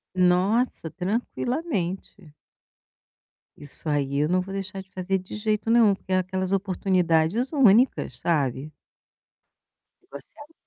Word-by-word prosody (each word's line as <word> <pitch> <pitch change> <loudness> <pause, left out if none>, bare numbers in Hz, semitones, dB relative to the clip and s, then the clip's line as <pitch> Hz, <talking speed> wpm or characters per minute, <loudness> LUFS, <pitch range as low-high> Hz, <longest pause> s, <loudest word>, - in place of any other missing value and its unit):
Nossa, 185 +2 +1
tranquilamente. 195 - -3 1.2
Isso 145 +2 -12
aí 140 -2 0
eu 150 - +2
não 185 +1 +2
vou 190 +1 -8
deixar 195 0 -5
de 190 - -19
fazer 190 +1 -2
de 185 - -10
jeito 215 +1 -1
nenhum. 230 -3 +5
Porque 190 0 -10
é 185 - +3
aquelas 185 0 -2
oportunidades 185 +2 +1
únicas, 245 - +3
sabe? 145 -3 -1 1.3
Que 370 - -33
você - - -11
a 300 +3 -13
190 Hz, 125 wpm, -25 LUFS, 175-215 Hz, 1.3 s, nenhum